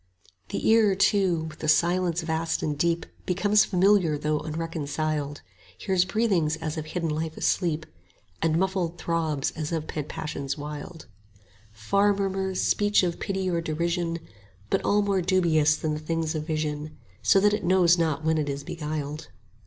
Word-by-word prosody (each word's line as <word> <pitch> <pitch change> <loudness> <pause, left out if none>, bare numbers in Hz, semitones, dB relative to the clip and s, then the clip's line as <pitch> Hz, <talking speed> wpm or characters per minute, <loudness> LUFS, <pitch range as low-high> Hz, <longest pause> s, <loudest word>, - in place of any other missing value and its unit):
The - - -2
ear, 220 -3 +5
too, 190 -4 +2
with 155 -1 -8
the 155 - -4
silence 175 +1 +2
vast 160 0 -1
and 150 - -1
deep 170 +3 0
15 - - -28
Becomes 205 +3 +3
familiar 185 -4 +3
though 150 +1 0
unreconciled; 155 -2 -3 0.4
Hears 185 -1 +1
breathings 190 -7 +1
as 160 -1 -4
of 155 -1 -5
hidden 165 0 -2
life 160 +1 -3
asleep, 160 -4 0 0.6
And 160 -1 +2
muffled 185 -2 -1
throbs 160 -4 -1
as 155 -1 -5
of 160 -2 -2
pent 150 -2 -5
passions 140 -2 -4
wild, 150 +3 -7 0.7
Far 200 - +2
murmurs, 190 -1 -1
speech 205 -1 +3
of 175 -2 -1
pity 190 -1 -2
or 170 -2 0
derision; 170 +1 -1 0.5
but - - +1
all 205 0 +3
more 200 -2 +1
dubious 165 -5 +3
than 155 -1 -2
the 150 - -3
things 160 +1 -2
of 155 -1 -4
vision, 155 -2 -1
20 155 +1 -9 0.3
So 195 - +5
that 205 +1 +3
it 210 - -1
knows 175 -1 +4
not 160 -1 0
when 160 0 +2
it 145 -1 -1
is 140 0 -4
beguiled. 150 -1 -5
165 Hz, 170 wpm, -26 LUFS, 155-185 Hz, 0.7 s, ear